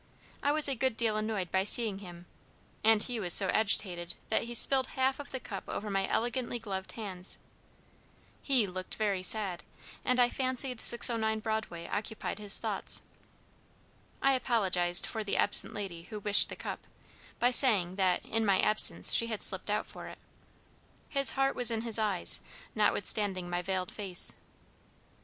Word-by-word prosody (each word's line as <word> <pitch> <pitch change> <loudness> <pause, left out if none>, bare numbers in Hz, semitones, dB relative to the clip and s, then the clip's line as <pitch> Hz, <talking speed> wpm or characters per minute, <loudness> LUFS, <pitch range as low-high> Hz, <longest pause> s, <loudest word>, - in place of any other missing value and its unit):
I 285 - +1
was 305 0 +3
a 275 - -1
good 255 -1 -2
deal 225 -2 0
annoyed 215 -4 -3
by 190 0 +1
seeing 210 -1 +4
him, 175 -3 -12 0.6
and 220 -1 +4
he 245 -2 -4
was 175 -5 +5
so 195 -2 +7
agitated 180 -5 0
that 220 - 0
he 240 0 -5
spilled 265 +2 +1
half 265 +1 0
of 285 - -9
the 260 - -6
cup 200 -5 -8
over 210 0 -5
my 195 0 -1
elegantly 240 +1 -2
gloved 195 -4 -6
hands. 190 -5 -4 1.0
He 260 -6 +1
looked 185 -1 -5
very 205 -4 -1
sad, 190 -2 +4 0.4
and 255 0 0
I 245 - +5
fancied 255 -1 -1
609 220 -2 +1
Broadway 215 -6 -4
occupied 210 +1 -5
his 205 -1 +2
thoughts. - - +1 1.2
I 275 0 +4
apologized 190 -8 +1
for 220 - -4
the 205 - -2
absent 205 - 0
lady 190 -5 -6
who 215 -2 -7
wished 205 0 +3
the - - -7
cup, - - -6 0.6
by 245 +1 +2
saying 210 -9 +3
that 185 -2 0
'in 225 0 -2
my 195 -3 +2
absence 215 - +3
she 230 - +6
had 220 -3 -4
slipped - - 0
out - - -1
for - - -10
it.' - - -11 0.9
His 275 -1 +6
heart 270 0 0
was 245 -2 +1
in 225 -1 -2
his 230 -1 0
eyes, 205 -5 0 0.3
notwithstanding 205 -3 -1
my 175 0 -2
veiled 185 0 -4
face. 190 -4 +1
215 Hz, 165 wpm, -30 LUFS, 190-235 Hz, 1.2 s, so